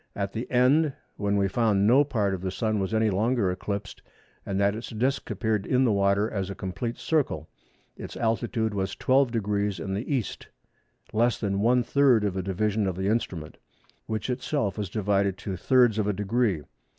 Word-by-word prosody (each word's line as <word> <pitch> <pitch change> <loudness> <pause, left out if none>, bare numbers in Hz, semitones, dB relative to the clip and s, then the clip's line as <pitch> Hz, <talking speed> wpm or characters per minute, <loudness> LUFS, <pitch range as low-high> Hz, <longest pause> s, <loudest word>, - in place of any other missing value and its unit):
At 100 -1 -3
the 115 +2 -4
end 135 +4 +3 0.2
when 100 0 0
we 100 -1 +2
found 100 -1 +2
no 130 +6 +6
part 105 -8 0
of 95 - -4
the 95 - -2
Sun 110 +2 -1
was 95 +1 -2
any 110 -1 +2
longer 105 0 +1
eclipsed, 100 +2 -5 0.5
and 95 -1 -1
that 100 0 +3
its 110 +1 -6
disc 125 +5 -1
appeared 110 -4 -1
in 130 0 +3
the 115 - +3
water 100 +1 +2
as 100 -4 -3
a 100 - -5
complete 115 +6 -4
circle, 135 - -1 0.5
its - - -8
altitude 115 -1 0
was 95 -1 -2
12° 105 -7 +1
in 95 +3 -4
the 105 +9 -3
E., 115 - -1 0.9
less 120 +2 +2
the 100 -3 -1
one 120 +5 +3
third 130 -4 +4
of 100 -3 -1
a 95 - -1
division 100 +2 0
of 95 - -2
the 95 +2 -1
instrument, 95 -8 -2 0.5
which 110 -2 -3
itself 130 -3 -1
was 105 -4 -4
divided 100 -2 0
to 95 -2 -5
thirds 120 +3 +3
of 105 - 0
a 105 - +1
degree. 105 -4 0
105 Hz, 185 wpm, -26 LUFS, 100-120 Hz, 0.9 s, no